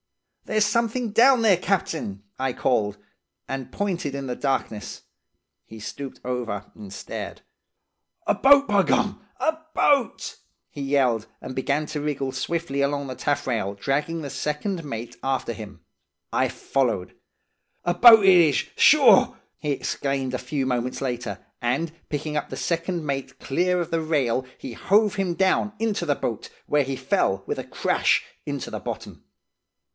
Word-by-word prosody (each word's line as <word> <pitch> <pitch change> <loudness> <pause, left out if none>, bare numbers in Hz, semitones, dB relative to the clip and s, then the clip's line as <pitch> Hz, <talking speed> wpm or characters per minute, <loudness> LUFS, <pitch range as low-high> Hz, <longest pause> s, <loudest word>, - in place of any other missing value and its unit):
"'There's 215 -1 +2
something 230 +2 0
down 245 +2 +5
there, 210 -4 +6
captain!' 165 - -2 0.2
I 130 0 0
called, 105 -6 0 0.5
and 135 -1 -5
pointed 180 -8 -2
in 140 -1 -4
the 125 -1 -3
darkness. 130 -7 -3 0.6
He 110 - -12
stooped 130 +6 -7
far 125 - -5
over, 110 -5 -4
and 105 -3 -10
stared. - - -6 0.8
"'A - - +3
boat, 280 +1 +6
by 200 -1 +4
gum! - - +1 0.2
A 320 0 +1 0.2
boat!' 275 -5 +2 0.3
he 145 - -7
yelled, 130 -5 +1
and 130 - -8
began 140 +3 0
to 150 -1 -4
wriggle 140 -3 -2
swiftly 140 +1 -2
along 140 0 0
the 130 - -5
taffrail, 125 -9 -1
dragging 150 +9 -1
the 140 - -5
second 165 +4 -2
mate 120 -5 -6
after 135 -3 -1
him. 105 -2 -10 0.5
I - - +2
followed. 120 -9 -1 0.7
'A 175 - +2
boat 225 +2 +9
it 190 -1 +8
is, 160 -6 +5 0.2
sure!' - - +6 0.2
he 150 - -2
exclaimed 135 -1 -2
a 125 - -1
few 130 +2 -2
moments 125 -1 -1
later, 120 -6 -3 0.2
and, 155 +7 0 0.2
picking 150 +1 -3
up 150 - -2
the - - -6
second 170 -1 -2
mate 135 -2 -4
clear 180 +5 +1
of 170 - -3
the 165 -1 +1
rail, 135 -6 0
he 125 - -7
hove 210 - +2
him 190 -3 -1
down 195 +3 +2
into 220 -6 0
the 145 -3 +2
boat, 115 -5 -4 0.2
where 145 -1 +2
he 135 0 -3
fell 130 - 0
with - - -3
a - - -3
crash - - +1 0.2
into - - -4
the - - -4
bottom. - - -7
140 Hz, 160 wpm, -24 LUFS, 125-175 Hz, 0.8 s, boat